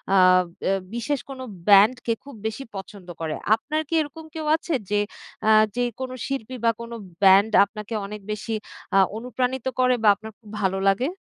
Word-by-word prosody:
আব 185 Hz, -1 st, +6 dB, 0.2 s
অ্যা 195 Hz, -, +2 dB, 0.2 s
বিশেষ 250 Hz, +4 st, -1 dB
কোনো 260 Hz, -1 st, -7 dB, 0.2 s
ব্যান্ডকে 215 Hz, +4 st, +5 dB
খুব 280 Hz, -3 st, -11 dB
বেশি 220 Hz, +5 st, -3 dB
পছন্দ 195 Hz, -1 st, -9 dB
করে। 155 Hz, -1 st, -2 dB, 0.2 s
আপনার 305 Hz, +7 st, -3 dB
কি -, -, -6 dB
এরকম 310 Hz, +2 st, -7 dB
কেউ 315 Hz, -, -4 dB
আছে 335 Hz, +1 st, -4 dB, 0.2 s
যে 205 Hz, 0 st, +2 dB, 0.5 s
আ -, -, +5 dB, 0.3 s
যে 245 Hz, -, +1 dB, 0.2 s
কোনো 260 Hz, -1 st, -4 dB
শিল্পী 260 Hz, -2 st, -4 dB
বা 230 Hz, -, +5 dB
কোনো 235 Hz, 0 st, -7 dB, 0.3 s
ব্যান্ড 195 Hz, +3 st, +6 dB
আপনাকে 210 Hz, +2 st, -8 dB
অনেক 210 Hz, +1 st, -7 dB
বেশি 210 Hz, +2 st, -4 dB, 0.4 s
আ -, -, +6 dB, 0.2 s
অনুপ্রাণিত 250 Hz, +2 st, -2 dB
করে? 255 Hz, 0 st, +4 dB
বা -, -, +4 dB
আপনার 220 Hz, +1 st, -10 dB
খুব 215 Hz, -3 st, -16 dB
ভালো 190 Hz, -1 st, +1 dB
লাগে? 205 Hz, +7 st, +1 dB
225 Hz, 175 wpm, -24 LUFS, 200-260 Hz, 0.5 s, আব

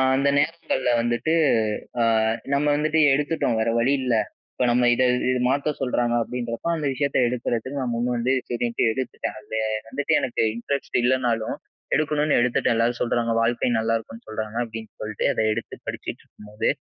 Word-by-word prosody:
அந்த 140 Hz, +1 st, +2 dB
நேரங்கள்ல 150 Hz, -4 st, 0 dB
வந்துட்டு, 120 Hz, +7 st, 0 dB, 0.7 s
அ -, -, +4 dB, 0.5 s
நம்ம 140 Hz, +1 st, +2 dB
வந்துட்டு 155 Hz, +2 st, +1 dB
எடுத்துட்டோம் 145 Hz, -4 st, 0 dB
வேற 115 Hz, -, +1 dB
வழி 125 Hz, +4 st, +3 dB
இல்ல. 125 Hz, -2 st, +1 dB, 0.4 s
இப்போ 125 Hz, -, 0 dB
நம்ம 120 Hz, 0 st, +3 dB
இத 130 Hz, -, +2 dB, 0.3 s
இது 125 Hz, -, 0 dB
மாத்த 140 Hz, +3 st, +1 dB
சொல்றாங்க 120 Hz, -2 st, 0 dB
அப்பிடின்றப்போ 120 Hz, +5 st, -4 dB
அந்த 155 Hz, -2 st, -3 dB
விஷயத்த 140 Hz, +1 st, 0 dB
எடுக்கிறதுக்கு 125 Hz, +2 st, -2 dB
நான் 125 Hz, -2 st, -2 dB
முன் 120 Hz, +1 st, -1 dB
வந்து 125 Hz, +3 st, +1 dB, 0.2 s
சரின்ட்டு 120 Hz, -1 st, -1 dB
எடுத்துட்டேன். 130 Hz, +1 st, -4 dB
அதில 110 Hz, -, -6 dB, 0.3 s
வந்துட்டு 140 Hz, +5 st, -1 dB
எனக்கு 120 Hz, -, -1 dB
இன்டரெஸ்ட் 140 Hz, +4 st, -2 dB
இல்லனாலும், 120 Hz, -3 st, +1 dB, 0.4 s
எடுக்கணுன்னு 150 Hz, 0 st, +1 dB
எடுத்துட்டேன், 120 Hz, -1 st, +2 dB
எல்லாரும் 120 Hz, +1 st, +1 dB
சொல்றாங்க. 120 Hz, -1 st, 0 dB
வாழ்க்கை 120 Hz, +1 st, +1 dB
நல்லாயிருக்கும்னு 115 Hz, 0 st, -3 dB
சொல்றாங்க, 110 Hz, 0 st, -5 dB
அப்பிடின்னு 110 Hz, -1 st, -9 dB
சொல்லிட்டு 110 Hz, -1 st, -3 dB
அத -, -, 0 dB
எடுத்து -, -, -5 dB
படிச்சிட்டு -, -, -6 dB
இருக்கும்போது, 105 Hz, 0 st, -4 dB
120 Hz, 155 wpm, -24 LUFS, 115-140 Hz, 0.7 s, அ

